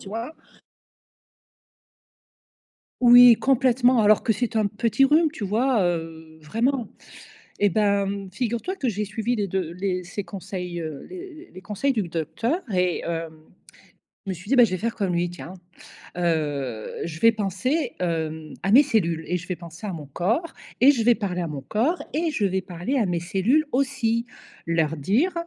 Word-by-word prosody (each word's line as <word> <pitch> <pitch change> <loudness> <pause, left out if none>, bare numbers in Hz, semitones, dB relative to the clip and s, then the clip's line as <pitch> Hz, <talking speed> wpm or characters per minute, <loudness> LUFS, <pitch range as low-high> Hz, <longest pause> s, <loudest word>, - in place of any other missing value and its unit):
tu - - -11
vois? 230 +9 -5 2.7
Oui, 245 -1 +9
complètement, 255 -1 +3
alors 210 0 +4
que 225 - +2
c'est 230 +2 -2
un 215 -1 +2
petit 230 +6 +1
rhume, 310 +4 +4
tu 230 - -7
vois? 225 +3 +1
Heu, 160 -2 -4
vraiment. 235 - -1 0.7
Eh 205 - +5
ben, 200 -1 0
figure-toi 240 - -2
que 270 -9 -1
j'ai 210 -1 -1
suivi 220 +4 -2
les 205 -2 -1
2 185 -3 -3
les 185 -1 -2
ses 185 +3 -6
conseils, 180 -3 -6
heu, 155 -3 -6
les 360 -2 -10
les 185 - -10
conseils 210 +8 -1
du 210 -7 -2
docteur 170 - -2
et, 180 -2 +1
heu, 165 -1 -3 1.0
je - - -3
me 190 - -2
suis 185 +4 -12
dit: - - +4
«Bah, 245 - +8
je 230 - +4
vais 185 - -1
faire 230 +5 -2
comme 195 -4 -1
lui, 175 0 0
tiens. 175 +1 -9 0.6
Heu, 145 -9 -1 0.2
je 160 -1 -6
vais 230 - +6
penser, 230 - -1
hem, 160 -3 -3
à 195 - 0
mes 265 +6 +9
cellules 170 - 0
et 180 - 0
je 180 - -11
vais 180 - -2
penser 170 +3 -12
à 200 - -3
mon 155 -4 -7
corps, 225 - -1 0.3
et 260 +4 +8
je 235 -5 -1
vais 240 +1 +6
parler 185 -5 -3
à 170 - -3
mon 145 -3 -5
corps 245 - 0
et 325 +2 0
je 245 -9 -1
vais 190 0 0
parler 180 +10 -3
à 230 - +2
mes 175 -1 -1
cellules, 215 - +1
aussi. 250 -3 0 0.4
Leur 160 -1 0
dire: 215 - +1
200 Hz, 180 wpm, -24 LUFS, 175-245 Hz, 2.7 s, Oui